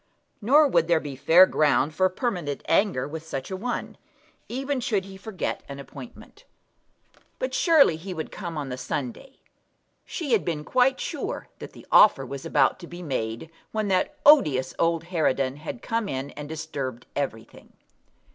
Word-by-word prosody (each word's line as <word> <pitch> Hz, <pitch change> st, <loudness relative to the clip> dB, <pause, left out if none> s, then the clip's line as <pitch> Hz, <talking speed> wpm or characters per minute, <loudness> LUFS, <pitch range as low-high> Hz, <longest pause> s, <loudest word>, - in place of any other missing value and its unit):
Nor 290 Hz, +8 st, +5 dB
would 170 Hz, -, +2 dB
there 170 Hz, -2 st, +3 dB
be 145 Hz, -3 st, -7 dB
fair 165 Hz, +7 st, +7 dB
ground 150 Hz, -3 st, +2 dB
for 185 Hz, +4 st, +2 dB
permanent 180 Hz, -, -3 dB
anger 165 Hz, -7 st, +2 dB
with 160 Hz, +2 st, -6 dB
such 135 Hz, 0 st, -6 dB
a -, -, -2 dB
one, 240 Hz, +6 st, -4 dB, 0.5 s
even 270 Hz, +2 st, -2 dB
should 210 Hz, -5 st, -1 dB
he 195 Hz, -1 st, -11 dB
forget 190 Hz, -1 st, -4 dB
an 140 Hz, -, -6 dB
appointment. 140 Hz, -, -12 dB, 0.9 s
But -, -, -3 dB
surely 330 Hz, -, +5 dB
he 185 Hz, +4 st, -8 dB
would 160 Hz, -3 st, -5 dB
come 170 Hz, -5 st, -6 dB
on 145 Hz, -2 st, -4 dB
the 125 Hz, 0 st, -5 dB
Sunday! 145 Hz, -, -5 dB, 0.7 s
She 315 Hz, -7 st, -5 dB
had 225 Hz, -4 st, +3 dB
been 155 Hz, -3 st, -3 dB
quite 255 Hz, +9 st, +2 dB
sure -, -, -4 dB
that -, -, -9 dB
the -, -, -14 dB
offer 145 Hz, -10 st, +6 dB
was 135 Hz, +1 st, -6 dB
about 140 Hz, +2 st, +2 dB
to 175 Hz, -, -10 dB
be 175 Hz, +1 st, -9 dB
made 125 Hz, 0 st, -4 dB, 0.2 s
when 215 Hz, -2 st, -1 dB
that 185 Hz, -1 st, +1 dB
odious 150 Hz, -, +5 dB
old 165 Hz, -1 st, +1 dB
harridan 140 Hz, -6 st, 0 dB
had 155 Hz, +10 st, -7 dB
come 225 Hz, -3 st, -1 dB
in 135 Hz, +2 st, -4 dB
and 145 Hz, 0 st, -8 dB
disturbed 140 Hz, -6 st, -5 dB
everything. 125 Hz, -6 st, -5 dB
165 Hz, 165 wpm, -25 LUFS, 140-215 Hz, 0.9 s, fair